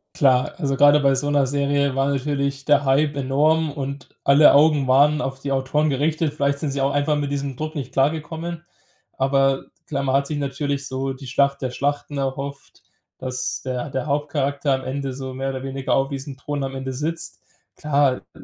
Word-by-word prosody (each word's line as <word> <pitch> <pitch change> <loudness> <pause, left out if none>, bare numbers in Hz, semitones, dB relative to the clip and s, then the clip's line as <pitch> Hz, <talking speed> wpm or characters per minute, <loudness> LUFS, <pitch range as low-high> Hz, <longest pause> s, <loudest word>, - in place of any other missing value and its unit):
Klar, 130 -3 +3
also 140 -6 -1
grade 145 +2 +6
bei 140 -1 +3
so 145 +2 -1
'ner 145 -2 +2
Serie 140 0 +1
war 135 +1 +1
natürlich 140 0 -2
der 145 -1 +4
Hype 145 +2 +2
enorm 150 +4 +2
und 140 -1 -6 0.2
alle 140 +2 +7
Augen 145 -2 +4
waren 145 +4 +4
auf 135 0 -4
die 140 0 -2
Autoren 135 +3 +1
gerichtet. 150 +2 0
Vielleicht 140 -1 0
sind 150 -2 -2
sie 135 0 -2
auch 135 - +2
einfach 145 +1 +1
mit 145 -1 -2
diesem 140 -1 -3
Druck 155 +4 -5
nicht 135 -4 -5
klargekommen. 160 +4 -1 0.5
Aber 135 0 +2 0.2
klar, 140 -4 -2
man 135 -1 +1
hat 140 0 +2
sich 150 0 -3
natürlich 140 0 -2
so 135 +1 -3
die 130 0 -11
Schlacht 140 +2 +1
der 130 -2 -2
Schlachten 145 +2 -2
erhofft, 140 +1 -5 0.4
dass 125 0 -3
der 130 +1 -3
der 130 0 -3
Hauptcharakter 145 -1 0
am 130 0 -2
Ende 135 +1 -3
so 130 0 -6
mehr 135 +1 -3
oder 130 -1 -6
weniger 135 0 -2
auf 135 0 +2
diesem 140 0 -6
Thron 145 +1 -4
am 135 0 -6
Ende 130 0 -4
sitzt. 160 +5 -4 0.4
Klar, 140 -3 +2
äh, - - -11 0.2
s - - -12
140 Hz, 200 wpm, -22 LUFS, 135-145 Hz, 0.5 s, alle